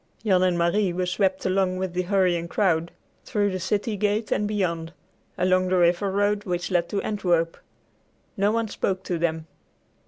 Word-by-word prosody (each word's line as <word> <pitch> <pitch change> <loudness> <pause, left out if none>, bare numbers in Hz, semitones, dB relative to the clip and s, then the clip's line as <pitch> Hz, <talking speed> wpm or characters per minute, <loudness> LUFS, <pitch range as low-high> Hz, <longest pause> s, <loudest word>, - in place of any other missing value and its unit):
Jan 190 -3 +4
and 180 -1 +2
Marie 180 +3 +2
were 180 +1 -1
swept 190 +1 0
along 185 -1 +1
with 185 -1 -3
the 180 - 0
hurrying 180 -3 +1
crowd, 170 -3 +1 0.3
through 205 -1 0
the 185 - -3
city 210 +4 -1
gate 210 +2 -1
and 210 - +1
beyond, 170 -5 -2 0.4
along 185 0 +2
the 185 0 +2
river 175 +3 +3
road 205 +1 +1
which 180 -1 -3
led 175 -1 +1
to 200 - -2
Antwerp. 175 -5 0 0.8
No 200 0 +2
one 230 0 0
spoke 190 -2 -2
to 175 -3 -2
them. 160 -1 -1
185 Hz, 175 wpm, -25 LUFS, 175-205 Hz, 0.8 s, Jan